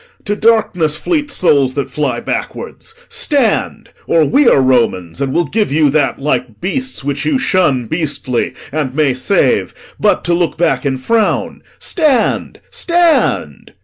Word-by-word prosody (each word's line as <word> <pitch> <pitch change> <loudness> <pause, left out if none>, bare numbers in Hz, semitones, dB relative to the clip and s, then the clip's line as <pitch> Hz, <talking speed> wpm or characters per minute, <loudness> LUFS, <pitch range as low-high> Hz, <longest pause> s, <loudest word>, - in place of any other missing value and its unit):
To 205 -1 -1
darkness 200 -9 +2
fleet 300 - -1
souls 140 - +2
that 140 - -3
fly 135 -5 -1
backwards! 450 - -6
Stand; 280 -7 0 0.2
Or 160 -2 +3
we 275 - +3
are - - +5
Romans 120 -7 +1
and 135 -1 -1
will 170 +5 +1
give 210 +4 -1
you 150 -1 +3
that, 145 -2 +1
Like 130 -5 -2
beasts, 260 - -3
which 140 0 -3
you 295 -3 +1
shun 175 - +1
beastly, 145 -4 -2 0.2
and 140 -3 -3
may 150 -4 +2
save 130 - 0 0.2
But - - +2
to 175 - +1
look 170 -1 0
back 140 -6 +1
in 135 -1 -1
frown. 220 - 0 0.2
Stand, 300 - 0
stand!' 340 -2 0
155 Hz, 145 wpm, -15 LUFS, 135-225 Hz, 0.2 s, are